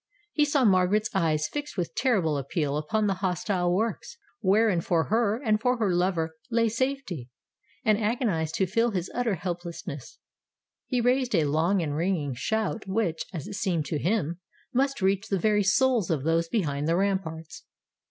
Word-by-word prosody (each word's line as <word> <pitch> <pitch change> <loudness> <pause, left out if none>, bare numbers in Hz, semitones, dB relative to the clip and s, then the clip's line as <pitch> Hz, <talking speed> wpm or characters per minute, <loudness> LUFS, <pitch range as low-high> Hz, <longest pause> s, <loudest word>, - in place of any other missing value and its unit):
He 300 - +3
saw 285 -3 +2
Margaret's 200 +3 +3
eyes 160 -5 +1
fixed 295 -4 -6
with 175 -2 -2
terrible 195 - +1
appeal 140 +1 -1
upon 210 +9 0
the 200 - +2
hostile 180 -1 0
works, 215 +3 -2 0.2
wherein 200 -2 +3
for 165 -1 0
her 225 0 +2
and 215 -5 +1
for 250 +1 +2
her 210 -5 +1
lover 170 -3 0
lay 230 -1 +2
safety; 230 - -2 0.6
and 215 -1 +4
agonized 210 - 0
to 190 - +2
feel 230 +6 +1
his 185 -4 -3
utter 240 -4 0
helplessness, 170 -5 -6 0.7
he 250 -2 0
raised 250 -1 +2
a 160 -3 +3
long 165 +6 +2
and 145 -2 -2
ringing 160 -4 0
shout 220 - -2
which, 190 -5 -1
as 165 -7 -6
it - - -7
seemed 190 -7 -1
to 150 +1 -2
him, 175 -2 0 0.3
must 270 -3 +1
reach 195 +2 +1
the 195 - 0
very 210 +2 +2
souls 230 +1 +2
of 150 -5 0
those 165 +1 +1
behind 150 -9 -1
the 165 - +2
ramparts. 165 -6 -2
190 Hz, 170 wpm, -27 LUFS, 165-225 Hz, 0.7 s, and